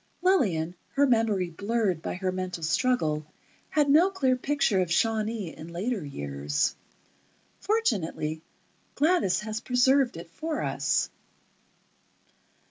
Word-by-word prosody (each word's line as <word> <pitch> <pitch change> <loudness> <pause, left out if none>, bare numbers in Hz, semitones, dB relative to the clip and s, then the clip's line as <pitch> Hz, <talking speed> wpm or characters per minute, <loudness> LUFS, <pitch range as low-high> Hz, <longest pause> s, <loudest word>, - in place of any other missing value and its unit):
Lillian, 190 - +2 0.2
her 285 +1 +5
memory 220 -8 +1
blurred 200 -1 -1
by - - -4
her 185 0 -1
mental 185 -2 -4
struggle, 160 -4 +1 0.5
had 300 -2 +2
no 315 +7 +6
clear 270 -10 +1
picture 255 -7 +1
of 175 -2 -2
Shawnee 215 -2 0
in 160 - -9
later 200 +3 -2
years. 70 - -2 0.8
Fortunately, 185 - -1 0.5
Gladys 305 - +2
has 215 +1 -4
preserved 255 -1 +3
it 165 0 -10
for 315 - -3
us. - - 0
215 Hz, 115 wpm, -27 LUFS, 165-260 Hz, 0.8 s, no